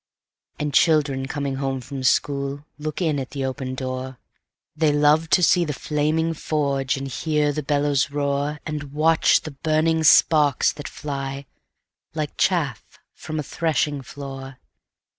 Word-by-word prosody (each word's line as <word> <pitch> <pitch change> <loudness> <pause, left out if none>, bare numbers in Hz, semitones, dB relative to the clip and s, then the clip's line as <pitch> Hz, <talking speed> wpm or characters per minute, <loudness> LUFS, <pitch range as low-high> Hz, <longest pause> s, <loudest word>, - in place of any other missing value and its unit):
And 150 -1 -3
children 145 -4 +3
coming 140 -1 -3
home 135 -1 -2
from 130 +2 -7
school 140 +2 0
Look 155 +4 -3
in 155 -4 +1
at 130 - -5
the 135 -2 -3
open 130 -1 -4
door; 130 0 -5 0.6
They 155 -1 +2
love 150 +2 +3
to 180 - +4
see 175 +1 +5
the 150 -3 -2
flaming 155 +3 0
forge, 140 -4 -1
And 135 0 -4
hear 150 +2 0
the 150 - -2
bellows 145 -1 +1
roar, 145 +1 -1
And 145 -2 -5
catch 160 +2 +4
the 155 - -7
burning 155 +3 +1
sparks 150 -2 +5
that 145 - -8
fly, 140 -1 -5 0.7
Like 155 -2 -3
chaff 150 - 0 0.3
from 155 - -6
a - - -2
threshing 150 -2 -1
floor. 135 -1 -8
145 Hz, 145 wpm, -23 LUFS, 135-155 Hz, 0.7 s, see